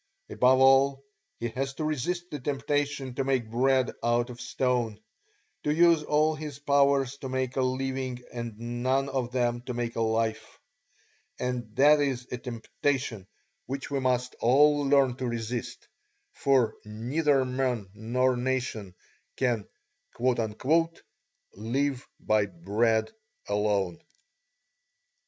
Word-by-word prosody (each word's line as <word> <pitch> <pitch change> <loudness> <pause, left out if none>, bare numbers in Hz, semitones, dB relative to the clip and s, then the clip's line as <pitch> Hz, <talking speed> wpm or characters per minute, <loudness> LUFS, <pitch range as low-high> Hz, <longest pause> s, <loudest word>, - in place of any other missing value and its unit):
Above 130 +1 +4
all, 135 +1 +5 0.4
he 120 - -2
has 135 +4 -3
to 155 - -4
resist 175 +4 -2
the 150 - -4
temptation 140 0 -2
to 135 - -1
make 130 -5 0
bread 130 +2 +2
out 120 +1 +1
of 120 0 -10
stone, 120 -4 -1 0.6
to 150 - +1
use 165 0 +5
all 150 +1 +2
his 150 -2 -7
powers 140 -1 +2
to 135 - -6
make 130 0 -2
a 135 - +1
living 130 0 -2 0.2
and 120 -3 -5 0.2
none 135 +2 +1
of 130 -3 -2
them 120 -1 0
to 125 0 -6
make 120 -1 -3
a 115 - -1
life; 110 0 -1 0.8
and 120 -3 -3
that 150 +2 +6
is 135 -4 -1
a 125 - -3
temptation 120 -3 -3 0.4
which 135 +2 -5
we 140 - 0
must 125 -1 0
all 145 +5 +5
learn 135 -3 +4
to 130 - -3
resist, 120 0 -4 0.5
for 130 -5 +2
neither 130 +6 +1
men 125 -5 -1
nor 125 +4 +1
nations 120 -6 -2 0.4
can 120 -5 0 2.0
"live 135 +3 -1
by 105 -1 +2
bread 105 +5 0 0.4
alone." 100 -4 0
130 Hz, 125 wpm, -28 LUFS, 120-135 Hz, 2.0 s, that